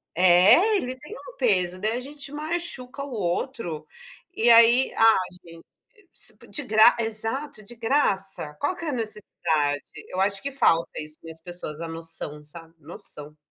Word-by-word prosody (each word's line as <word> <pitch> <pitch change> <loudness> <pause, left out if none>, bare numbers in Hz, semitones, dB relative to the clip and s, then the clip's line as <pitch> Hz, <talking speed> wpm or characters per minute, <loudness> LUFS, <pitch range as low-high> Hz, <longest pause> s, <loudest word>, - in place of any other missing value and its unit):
É, 185 - +6
ele 255 -7 -4
tem 300 +11 -11
um - - -11
peso. 185 -7 +1
Daí 215 +2 0
a 245 - -2
gente 280 +1 -7
machuca 295 -4 -3
o 285 - -8
outro. 175 - -3 0.5
E 235 -4 +2
aí 235 +3 +6
ah, 225 0 +5 0.8
gen 405 -4 -25
s - - -2
po - - -17
de 295 - -4
gra 220 0 +5
exato, 225 +3 -3
de 240 +4 -10
graça, 195 - 0
qual 360 +6 -1
que 335 - -8
é 300 - -1
a - - -4
necessidade? 165 - -1 0.3
Eu 185 - -4
acho 195 0 +1
que 280 - -4
falta 165 -11 +2
isso 155 0 -8
nas 160 0 -9
pessoas, 175 -3 -7
a 165 - -5
noção, 165 -2 -2
sabe, 165 +2 -12
noção. 150 -1 -4
215 Hz, 170 wpm, -25 LUFS, 165-265 Hz, 0.8 s, É